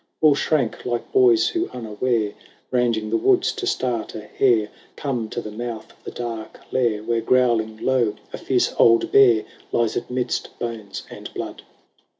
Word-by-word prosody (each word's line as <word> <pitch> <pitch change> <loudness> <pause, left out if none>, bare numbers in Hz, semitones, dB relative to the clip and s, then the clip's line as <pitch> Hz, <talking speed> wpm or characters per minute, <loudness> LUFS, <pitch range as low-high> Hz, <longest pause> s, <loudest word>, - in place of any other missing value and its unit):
All 155 -2 +6
shrank, 140 -4 0
like 120 -1 -3
boys 380 -3 +5
who 345 0 -1
unaware, 110 -1 -1 0.4
Ranging 115 -4 +1
the - - +3
woods 380 0 +3
to 395 -3 -4
start 125 - -1
a 110 - -5
hare. 110 0 +2 0.3
Come 125 -6 -3
to - - -4
the 105 - -7
mouth 115 0 -6
of - - -30
the - - -6
dark 115 -2 -6
lair 115 -5 +1
Where, 115 0 0
growling 115 -4 +2
low, 120 -3 +1 0.2
a - - -5
fierce - - +1
old 115 0 +5
bear 120 -5 +6 0.3
Lies 115 -2 +1
amidst 125 0 -3
bones 110 -4 -5
and - - -9
blood. - - -5
120 Hz, 160 wpm, -22 LUFS, 110-130 Hz, 0.4 s, All